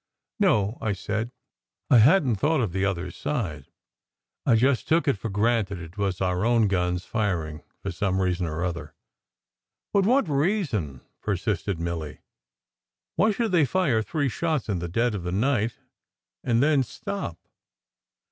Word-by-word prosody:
"No," 110 - +2
I 105 - 0
said. 110 +4 -3 0.6
"I 125 - +8
hadn 145 - +5
t 100 - -4
thought 155 +6 +2
of 110 -8 0
the 95 +2 -1
other 95 -2 -1
side. 85 - -3 0.8
I - - +6
just 130 +2 +2
took 165 0 +2
it 140 - +3
for 110 +3 -5
granted 105 -1 +1
it 85 0 -10
was 100 -3 -1
our 90 0 0
own 115 -2 +3
guns 90 -1 0
firing 85 -9 -2 0.2
for 95 - -2
some 95 +2 0
reason 90 -2 0
or 80 +2 -3
other." 85 -4 -4 1.0
"But 200 -1 +3
what 255 -2 +3
reason?" 140 - 0 0.2
persisted 100 -2 -1
Milly. 85 -3 -4 1.0
"Why 220 - +4
should 220 0 0
they 175 -4 +4
fire 140 -9 +1
three 145 +5 -1
shots 155 +1 -1
in 95 -4 0
the 85 - -4
dead 115 +7 +1
of 100 - -3
the 90 +1 -4
night, 115 +2 +1 0.7
and 120 +1 +2
then 150 -2 +4
stop?" 130 - -5
105 Hz, 155 wpm, -26 LUFS, 90-140 Hz, 1.0 s, I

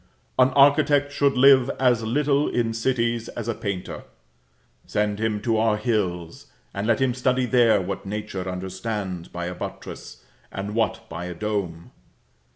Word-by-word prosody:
An 130 0 +6
architect 145 0 +4
should 140 -2 +1
live 135 -1 +6
as 125 -3 +3
little 140 +5 +1
in 115 -2 0
cities 115 -1 -1
as 120 -2 -6
a 115 - 0
painter. 100 -5 -5 0.8
Send 105 0 -1
him 110 -1 0
to 115 -1 +1
our 110 -1 +2
hills, 95 -7 -2 0.3
and 100 +2 -3
let 115 - +2
him 130 -2 +2
study 125 0 +1
there 120 -4 +4
what 95 +1 -4
nature 100 -2 -5
understands 95 0 -4
by 85 0 -5
a 90 - -4
buttress, - - -8 0.3
and 100 +2 -5
what 110 0 -1
by 85 -1 -6
a 90 -1 -6
dome. 90 -4 -4
110 Hz, 155 wpm, -24 LUFS, 100-125 Hz, 0.8 s, An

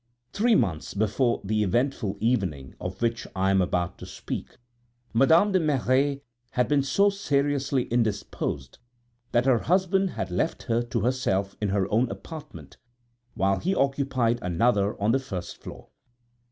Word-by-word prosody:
Three 230 +2 +3
months 90 - -1
before 110 +4 +1
the 105 +2 0
eventful 105 0 0
evening 95 - -1
of 90 +5 -5
which 115 0 -1
I 95 +1 +2
am 95 -1 +4
about 90 0 -1
to - - -9
speak, - - -6 0.6
Madame 160 - +5
de 190 - +3
Merret 140 -2 +1 0.3
had 125 0 0
been 145 -1 +3
so 200 +9 +3
seriously 140 -8 0
indisposed 105 - -2 0.5
that 120 +1 +2
her 130 -3 +4
husband 190 - +2
had 95 - -4
left 125 - -1
her 115 -1 +1
to 120 -1 -2
herself 100 -5 0
in 105 - 0
her 95 -1 +1
own 115 +3 +2
apartment, 145 +9 -9 0.6
while 95 0 +1
he 190 +3 0
occupied 135 -4 +1
another 100 +3 +1
on 105 +2 +2
the 135 - +3
first 95 -9 -7
floor. - - -10
120 Hz, 150 wpm, -26 LUFS, 100-140 Hz, 0.6 s, Madame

